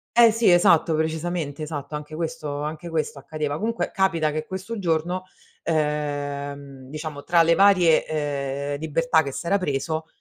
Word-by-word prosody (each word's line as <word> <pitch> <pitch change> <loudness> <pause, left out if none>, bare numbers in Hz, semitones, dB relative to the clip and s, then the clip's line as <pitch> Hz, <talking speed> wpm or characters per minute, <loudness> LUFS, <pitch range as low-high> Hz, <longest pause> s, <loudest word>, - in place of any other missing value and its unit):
Eh 235 -1 +8
sì, 225 -3 +4
esatto, 170 -2 +5
precisamente, 160 -1 -2
esatto. 150 -1 -5
Anche 150 +1 -7
questo 155 -3 -4
anche 155 +3 -5
questo 155 -3 -2
accadeva. 150 0 -3
Comunque 230 +5 -2
capita 170 -5 +1
che 155 +1 -3
questo 190 +6 -5
giorno, 175 0 -1 0.4
ehm, 145 -3 -3
diciamo 155 -1 -6
tra 170 -1 +4
le 170 +1 +4
varie, 185 -5 +5
ehm, 140 -2 -2
libertà 160 +1 +2
che 140 - -4
s'era 170 +8 0
preso, 160 -1 -2
155 Hz, 145 wpm, -24 LUFS, 145-170 Hz, 0.4 s, Eh